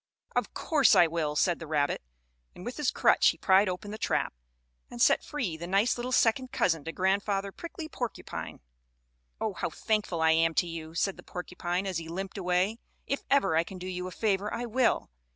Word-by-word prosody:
"Of - - -1
course 300 -4 +4
I 175 - +7
will," 160 -2 -1
said 175 +3 +2
the 165 - -7
rabbit, 145 -2 0 0.5
and 180 - -10
with 245 - -5
his 295 -4 +1
crutch - - +4
he - - +3
pried 190 +1 +4
open 185 +3 -5
the 215 - -6
trap, - - 0 0.6
and 120 - -9
set - - +4
free 230 - -3
the 170 +2 -6
nice 200 +6 +2
little 245 +1 -4
second 250 +1 +2
cousin 165 -4 +1
to 165 - -3
Grandfather 195 +2 0
Prickly 335 - -7
Porcupine. 245 -6 -6 0.8
"Oh, - - -1
how - - -2
thankful 210 -6 -1
I 160 0 +4
am 165 0 +3
to - - +3
you," 165 -1 -7
said 195 +3 0
the - - -12
porcupine, 180 +1 -3
as 185 -4 -1
he 165 -1 -8
limped 190 +3 -5
away. 185 +5 +1 0.3
"If 275 - -2
ever 275 - +3
I 165 - +4
can 185 +2 -9
do 180 - -7
you 180 0 -4
a - - -7
favor 205 0 0
I 240 +1 -3
will." 240 - +1
190 Hz, 205 wpm, -29 LUFS, 170-220 Hz, 0.8 s, I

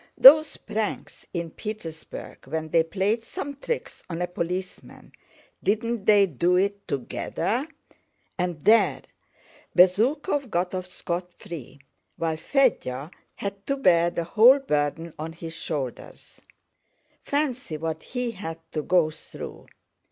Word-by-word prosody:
Those 305 +3 +9
pranks 215 0 -4
in 170 -2 -3
Petersburg 170 - -8
when 160 +2 -3
they 165 +1 +4
played 200 +7 0
some 280 +4 -5
tricks 480 - -4
on 165 -1 -4
a 180 - +1
policeman, 180 +1 -5 0.5
didn't 225 +1 0
they 205 -2 +6
do 175 +2 +1
it 200 +2 0
together? 225 - -2 0.7
And 175 -3 -2
there! 225 +2 +4 0.7
Bezúkhov 255 - +3
got 180 -1 -1
off 185 -1 -4
scotfree, 170 -6 -6 0.4
while 160 -1 -1
Fédya 160 - +1 0.2
had 200 0 -5
to 275 - 0
bear 170 -9 +4
the 170 0 -2
whole 225 +10 +7
burden 160 - -1
on 160 +1 -5
his 165 0 -8
shoulders. 145 -6 -6 0.8
Fancy 265 - -1
what 160 +1 -3
he 250 -1 -3
had 180 -6 -6
to 155 - -1
go 170 -1 +3
through! - - -10
180 Hz, 120 wpm, -26 LUFS, 165-225 Hz, 0.8 s, Those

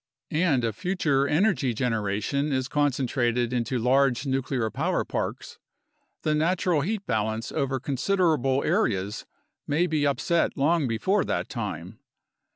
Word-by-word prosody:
And 155 -6 +2
if 110 -3 -2
future 150 -7 +1
energy 150 - +1
generation 115 +4 -1
is 130 -2 0
concentrated 125 -4 0
into 125 +1 -1
large 125 +2 +2
nuclear 130 -4 -1
power - - -1
parks, - - -4 0.6
the 155 - +1
natural 165 +1 +1
heat 200 +5 -2
balance 110 0 -1
over 135 -1 -1
considerable 140 -1 +1
areas 100 -1 0 0.4
may 155 +5 +2
be 155 -4 +1
upset 140 +5 0
long 150 +1 +2
before 155 - +1
that - - -2
time. - - -5
135 Hz, 125 wpm, -26 LUFS, 120-155 Hz, 0.6 s, And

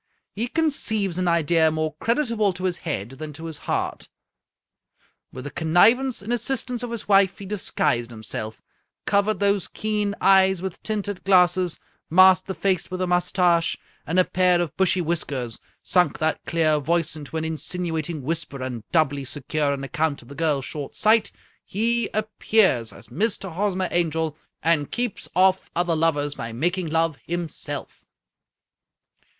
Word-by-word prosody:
He 225 +4 -2
conceives 220 - 0
an 180 - 0
idea 165 -1 +3
more 155 0 -2
creditable 230 - +1
to 180 +1 -8
his 180 -2 0
head 115 - -3
than 155 -1 -6
to 160 +3 -9
his 160 -2 -7
heart. - - -2 1.2
With 130 - -8
the 145 - -6
con 160 - -4
nivance 230 +9 +4
and 225 +4 -2
assistance 245 0 -2
of 245 - -4
his 235 -2 -5
wife, 195 -2 +4
he 200 - -9
disguised 150 - -1
himself, 110 -1 -6 0.4
covered 200 0 +1
those 200 -2 +1
keen 210 -1 -1
eyes 190 -1 +5
with 190 -1 -6
tinted 205 -3 -3
glasses 180 -2 +3 0.3
masked 185 +2 +6
the 190 - -4
58 - - -26
A. - - -25
Conan 195 - +4
Doyle 185 - +2
face - - -8
witii 185 0 -3
a - - -1
mustache 180 -1 +2 0.3
and 170 +4 +2
a - - +6
pair 180 -1 +3
of 170 -5 -2
bushy 190 -1 +2
whiskers, 145 -8 -2 0.2
sunk 180 -1 +2
that 160 0 -1
clear 155 -2 +2
voice 165 +1 0
into 155 +1 -6
an 160 - -2
insinuating 160 -1 -3
whisper, 150 -3 -3
and 125 -4 -5
doubly 145 -4 +2
secure 145 +2 -2
on 140 -1 -3
account 140 +2 -1
of 120 - -18
the - - -8
girl's 145 -4 0
short 145 -3 -6
sight, 220 +1 +3 0.3
he 230 +2 +1
appears 215 - +2
as - - -14
Mr. 195 - -2
Hosmer 190 0 0
Angel, 160 -2 0 0.3
and 160 -3 +2
keeps 245 -4 -3
oflE 190 0 +4
other 175 -1 +1
lovers 145 -3 +1
by 115 -5 -6
making 175 +9 -1
love 165 -1 0
himself." 175 -2 -5
175 Hz, 165 wpm, -24 LUFS, 155-195 Hz, 1.2 s, masked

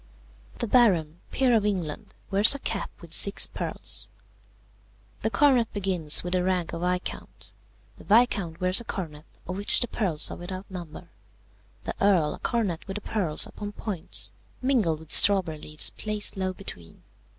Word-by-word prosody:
"The - - -3
Baron, 180 -10 +2
peer 255 -3 +2
of 215 - +2
England, 185 -8 -4 0.2
wears 205 +7 +8
a - - -6
cap - - -4
with - - -7
six - - +6
pearls. - - -3 1.1
The 220 - 0
coronet 240 +1 +2
begins 185 -6 +2
with 175 0 -3
the 180 -1 +1
rank 180 -2 -1
of 165 - -5
Viscount. 180 +1 -4 0.5
The - - -13
Viscount 205 -7 +2
wears 185 +3 +4
a - - -9
coronet 160 -9 -7 0.2
of 185 - -5
which 205 - +4
the 245 - 0
pearls 180 -10 -1
are - - -7
without 185 +2 -8
number. 170 -4 -9 0.7
The - - -4
Earl 185 -7 +3
a - - -10
coronet 205 -9 -2
with 195 - -6
the 210 - -5
pearls 185 -8 +2
upon 205 0 -8
points, 200 -6 -3 0.3
mingled 220 - 0
with 160 - -13
strawberry 185 -6 +5
leaves 150 0 -1
placed 210 -1 -4
low 190 -1 -2
between. 90 - -10
190 Hz, 160 wpm, -26 LUFS, 170-210 Hz, 1.1 s, wears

